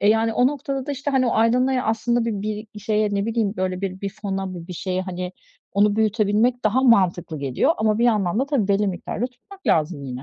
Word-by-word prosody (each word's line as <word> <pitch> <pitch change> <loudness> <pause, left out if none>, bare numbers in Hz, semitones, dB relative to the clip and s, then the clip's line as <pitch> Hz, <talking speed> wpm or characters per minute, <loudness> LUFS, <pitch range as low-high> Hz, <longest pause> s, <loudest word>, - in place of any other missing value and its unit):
E, 205 - +3
yani 225 +1 +3
o 245 +3 +3
noktada 275 -1 -3
da, 290 - -2
işte, 280 +2 -3
hani, 260 -2 +2
o - - +1
aydan 235 +3 +3
aya 260 -1 0
aslında 230 +2 +1
bir 215 0 -3
bir 210 - -9
şeye, 210 -1 0
ne 200 +2 0
bileyim, 220 -3 0
böyle 185 0 -2
bir 190 -1 -4
bir 200 -1 -3
fona, 195 -2 -3
bu 170 -1 -8
bir - - -5
şeye 185 +1 -2
hani 180 -1 -5 0.4
onu 205 +1 +3
büyütebilmek 220 +3 +2
daha 235 +5 +2
mantıklı 180 - +3
geliyor 140 - +1
ama 215 0 +2
bir 235 - +3
yandan 210 -5 +2
da 275 - 0
tabii 255 -9 0
belli 200 +1 +2
miktarda 195 +5 -3
tutmak 375 +11 -17
lazım 155 -2 +1
yine. 130 0 -6
210 Hz, 230 wpm, -22 LUFS, 190-240 Hz, 0.4 s, E